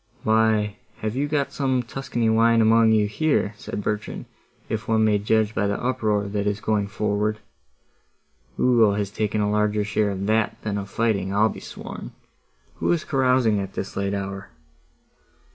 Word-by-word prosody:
"Why, 110 -1 +2 0.3
you 110 - +1
have 140 +5 -2
got 145 -2 0
some 130 -3 0
Tuscany 120 -1 -2
wine 115 +1 +4
among 110 0 +5
you, 110 -1 +4
here," 110 -1 0
said 105 - -6
Bertrand, 105 +1 -3 0.4
"if 110 -1 -4
one 110 -1 +3
may 105 -1 +3
judge 110 +1 +1
by 100 -1 0
the 100 - -1
uproar 110 -5 0
that 100 0 -2
is 105 0 -1
going 105 -1 0
forward. 105 +1 -1 1.2
Ugo 115 -5 +4
has 100 -1 -2
taken 105 0 -1
a 105 0 +1
larger 105 0 +1
share 105 0 0
of 100 0 -3
that 110 +1 +1
than 105 -2 -2
of 100 0 -7
fighting, 100 -5 0
I'll 105 +2 +3
be - - -7
sworn. - - -9 0.6
Who - - 0
is 170 -2 +1
carousing 125 -5 +2
at 95 -1 -5
this 95 - -5
late 100 0 -1
hour?" 95 0 -5
105 Hz, 170 wpm, -24 LUFS, 105-115 Hz, 1.2 s, among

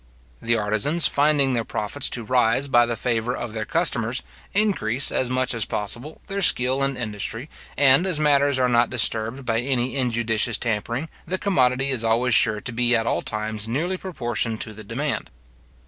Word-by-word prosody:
The 115 0 +1
artizans, 110 +11 +1
finding 145 -2 +2
their 115 -2 0
profits 110 +6 -2
to 120 - -3
rise 125 +3 +1
by 120 -3 +4
the 120 - -2
favour 115 +1 -2
of 120 -2 -6
their 110 -1 -4
customers, 130 -7 0 0.3
increase, 185 - +2
as 130 - 0
much 130 0 0
as 115 -2 0
possible, 120 +11 -2
their 200 0 -4
skill 130 -5 +4
and 135 -1 0
industry; 115 +4 -5 0.3
and 145 +5 +5
as 170 -5 0
matters 145 -2 +2
are 130 -1 +2
not 120 -1 +2
disturbed 115 +1 0
by 115 -1 0
any 130 0 -1
injudicious 120 -3 0
tampering, 120 +6 -3 0.2
the 185 - -2
commodity 135 -8 +1
is 125 -4 0
always 115 +2 +1
sure 110 -1 +4
to 120 - -4
be 120 +1 +2
at 115 0 0
all - - 0
times 110 0 -4
nearly 160 +11 -2
proportioned 120 - -3
to 110 - -4
the 110 +1 -10
demand. 130 +7 -3
125 Hz, 180 wpm, -23 LUFS, 115-140 Hz, 0.3 s, and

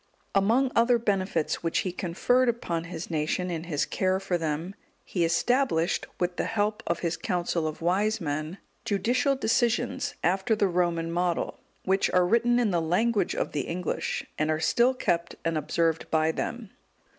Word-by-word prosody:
Among 230 +7 +3
other 235 +1 +4
benefits 195 -7 -1
which 165 -1 0
he 185 - -1
conferred 235 +9 +1
upon 170 -8 -2
his 170 0 -7
nation 160 +3 -1
in 165 -1 -4
his 150 -4 0
care 185 0 0
for 190 -2 -2
them, 165 +2 -2 0.3
he 175 - -1
established, 175 +1 +1
with 175 0 -1
the - - 0
help 210 0 -1
of 170 - -1
his 170 -1 0
council 170 -1 -1
of 155 +1 -6
wise 205 +5 +1
men,(193) 155 +2 -3 0.3
judicial 245 +7 +1
decisions, 245 +3 0
after 190 +5 +2
the 205 -1 +2
Roman 170 -2 0
model; 175 0 -1 0.3
which 195 +1 +2
are 180 -1 +3
written 235 +4 +3
in 235 -4 +2
the 170 -2 +1
language 200 +4 +1
of - - -2
the 145 - -2
English, 175 0 -2
and 155 +1 +1
are 155 0 +1
still 240 +10 +3
kept 170 -8 -1
and 165 0 0
observed 165 +1 0
by 160 0 +2
them. 225 +4 -4
180 Hz, 170 wpm, -27 LUFS, 165-220 Hz, 0.3 s, other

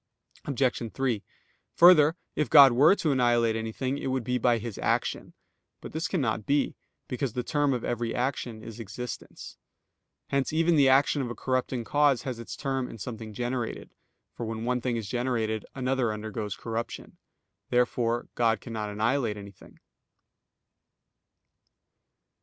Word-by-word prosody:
Obj. 125 -4 -1
3: 125 -6 -1 0.5
Further, 170 -3 +7 0.2
if 150 - 0
God 140 -3 +9
were 145 +10 +6
to 160 -6 0
annihilate 120 -3 +2
anything 120 +5 -3
it - - -4
would 130 -1 -1
be 125 +2 -1
by 120 0 +3
His 115 -2 -6
action. - - -1 0.4
But - - -9
this 160 +2 -2
cannot 120 - -1
be; 145 0 +1 0.3
because 125 -2 -3
the 125 - -2
term 145 +2 +1
of 125 -3 -2
every 120 -1 -2
action 120 -3 -2
is 115 0 -9
existence. 115 +3 -8 0.7
Hence 140 -1 +1
even 165 +2 +3
the 140 -3 +5
action 140 +2 +4
of 125 - -3
a 120 - -5
corrupting 130 -1 -1
cause 145 0 +2
has 125 -3 -4
its 115 - -7
term 135 -3 -2
in - - -9
something 110 -1 -7
generated; 120 +2 -4 0.4
for - - -6
when 115 0 -4
one 125 0 0
thing 120 -1 -1
is 110 -3 -4
generated 115 -2 -1
another 130 -3 0
undergoes 105 -1 -4
corruption. 115 0 -5 0.5
Therefore 120 -1 +1
God 115 -3 +2
cannot 110 -3 -5
annihilate 110 +1 0
anything. 100 -2 -13
125 Hz, 145 wpm, -28 LUFS, 115-135 Hz, 0.7 s, God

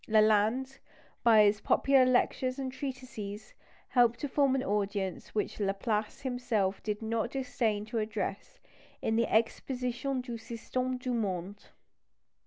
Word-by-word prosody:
Lalande, 220 +5 +3 0.4
by 225 -3 +7
his 205 0 +3
popular 270 -2 +4
lectures 255 0 +1
and 265 -1 -3
treatises, 250 -6 -6 0.4
helped 240 -2 +3
to 290 - -1
form 275 -1 +2
an 260 - 0
audience 200 -2 -2
which 210 - -2
Laplace 210 +2 -1
himself 245 -7 -1
did 210 0 -3
not 225 +1 -1
disdain 235 -5 -1
to 225 +1 -2
address 215 - -4 0.4
in 220 - +1
the 230 0 +1
Exposition 250 +3 0
du 240 -2 -6
Système 250 +3 -3
du 250 0 -3
Monde. 200 -3 -3
230 Hz, 130 wpm, -31 LUFS, 210-255 Hz, 0.4 s, by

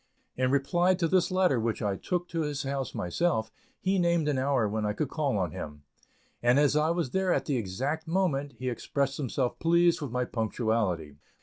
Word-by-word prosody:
In 130 0 +1
reply 175 +7 +2
to 170 -2 0
this 185 +1 +2
letter, 185 -9 +2
which 115 0 -1
I 100 -2 0
took 175 - -2
to 165 -2 -2
his 150 -2 -2
house 135 -2 -3
myself, 110 - 0 0.3
he 190 0 +1
named 170 -3 +2
an 140 -3 +1
hour 130 -4 +2
when 110 +1 -2
I 105 0 0
could 135 +6 -2
call 140 -7 0
on 90 -5 -1
him, 75 -1 -7 0.6
and 120 +2 +4
as 145 0 +4
I 150 +1 +3
was 170 -6 -1
there 190 -1 +1
at - - +1
the 140 -4 0
exact 130 +10 -3
moment, 160 -6 0
he 130 - -5
expressed 135 +2 -1
himself 130 -2 -2
pleased 170 0 +3
with 145 - -3
my 125 +1 -1
punctuality. 110 - -1
140 Hz, 200 wpm, -29 LUFS, 115-165 Hz, 0.6 s, and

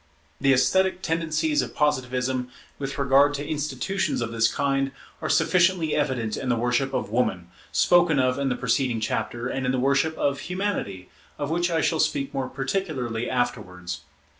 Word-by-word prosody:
The 135 0 +3
esthetic 185 +8 +2
tendencies 165 - 0
of - - -6
Positivism, 130 -3 0 0.3
with 135 -1 -4
regard 140 +1 +4
to 145 +1 -4
institutions 155 +5 -1
of 115 -1 -2
this 115 0 +2
kind, 135 -1 0 0.3
are - - -2
sufficiently 175 -3 +3
evident 130 -7 -1
in 130 - -4
the 120 - +3
worship 125 +3 0
of 100 - -3
Woman, 95 -7 0 0.2
spoken 175 -4 +4
of 130 0 +2
in 140 -1 0
the 125 - 0
preceding 125 -1 0
chapter, 110 +2 -2
and 135 +1 -3
in 125 - +1
the 130 - 0
worship 140 +5 +1
of 140 -1 0
Humanity, 180 - -3 0.3
of 145 +1 -3
which 175 +1 +1
I 165 -2 +1
shall 160 -1 +1
speak 140 -1 0
more 135 -2 -2
particularly 135 -6 -2
afterwards. 90 -8 -3
135 Hz, 165 wpm, -25 LUFS, 125-155 Hz, 0.3 s, regard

